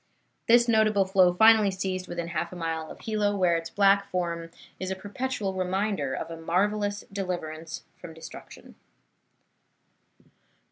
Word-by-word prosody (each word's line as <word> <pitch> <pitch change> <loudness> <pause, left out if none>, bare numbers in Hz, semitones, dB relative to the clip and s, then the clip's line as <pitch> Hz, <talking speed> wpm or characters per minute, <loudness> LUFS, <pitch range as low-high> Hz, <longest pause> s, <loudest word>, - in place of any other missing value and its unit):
This 240 0 +6
notable 215 -3 +3
flow 185 -2 +4
finally 220 0 +6
ceased 185 -1 -3
within 170 -1 -4
half 170 0 -3
a - - -8
mile 165 -2 -3
of - - -11
Hilo, 210 -2 0
where 180 -3 +3
its 165 0 -3
black 200 +1 +3
form 170 -2 -3 0.3
is 185 - -4
a 190 - -2
perpetual 205 +1 -3
reminder 185 -5 -1
of 165 - -5
a 165 0 -8
marvellous 205 +4 0
deliverance 165 -4 -5
from 165 -2 -11
destruction. 160 - -12
190 Hz, 140 wpm, -27 LUFS, 170-205 Hz, 0.3 s, This